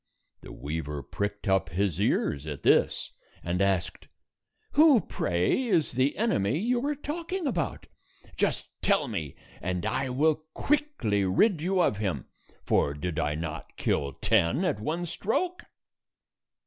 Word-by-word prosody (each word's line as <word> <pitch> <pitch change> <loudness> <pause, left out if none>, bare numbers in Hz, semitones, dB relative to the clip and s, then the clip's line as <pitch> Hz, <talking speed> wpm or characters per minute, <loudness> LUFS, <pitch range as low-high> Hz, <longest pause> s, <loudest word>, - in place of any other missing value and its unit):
The - - -10
weaver 75 -1 -4
pricked 100 +8 -4
up 95 -3 +2
his 95 +1 0
ears 75 -7 +1
at 75 -2 -6
this, - - +3 0.3
and 90 +2 -1
asked, 95 -3 0 0.6
"Who, 295 -4 +7
pray, 90 - 0
is 175 -8 +2
the 130 +3 +1
enemy 150 - +1
you 240 +6 0
are 295 - 0
talk 320 +4 -6
ing 375 -3 -1
about? 175 - -2 0.5
Just - - 0
tell - - +2
me, 75 -4 -4 0.3
and 90 -1 -2
I 135 - -1
will 150 +5 +2
quickly 295 - +1
rid 155 - +3
you 185 +2 +2
of 105 - +1
him, 100 -4 -2 0.4
for 70 - +2
did 80 +2 -3
I 75 -2 0
not 80 0 -6
kill 70 -1 0
ten 120 - +2
at 140 - 0
one 165 +10 -2
stroke?" 350 - -2
105 Hz, 145 wpm, -28 LUFS, -, 0.6 s, Who